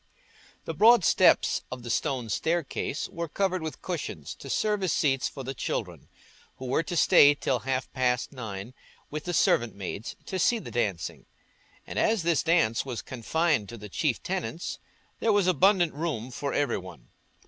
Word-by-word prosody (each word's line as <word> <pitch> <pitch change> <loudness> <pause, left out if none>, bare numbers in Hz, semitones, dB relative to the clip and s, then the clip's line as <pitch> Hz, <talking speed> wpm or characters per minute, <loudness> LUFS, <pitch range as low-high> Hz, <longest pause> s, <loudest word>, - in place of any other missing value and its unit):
The - - -3
broad 225 -3 +6
steps - - +4
of 125 -1 -6
the 120 - -4
stone 130 -3 -1
staircase 165 +10 -1
were 170 0 -5
covered 185 +2 -1
with 160 -1 -6
cushions 85 - -4
to 135 - -9
serve 210 +6 0
as 185 -4 +1
seats 135 -4 +1
for 135 - -8
the 135 +2 -4
children, - - -4 0.5
who 130 - -7
were 130 +5 +1
to 165 +2 -5
stay 145 -3 +6
till 130 -3 0
half 130 +2 -3
past 125 -2 0
nine 110 -2 -7 0.4
with 155 +1 -5
the 175 - -2
servant 120 -6 +2
maids 100 +2 -6
to 190 - -3
see 235 +7 +3
the 220 - -8
dancing, 100 - -2 0.6
and - - -4
as 220 -5 +2
this 165 -3 +2
dance 140 -10 +2
was 125 -6 -5
confined 130 - 0
to 120 - -8
the 105 -1 -9
chief 125 +4 -1
tenants, 180 -2 -4 0.4
there 225 - +2
was 205 -2 +3
abundant 185 -1 +3
room 140 -6 -3
for 140 +3 -3
every 145 -6 0
one. 90 -10 -12
145 Hz, 175 wpm, -27 LUFS, 120-175 Hz, 0.6 s, broad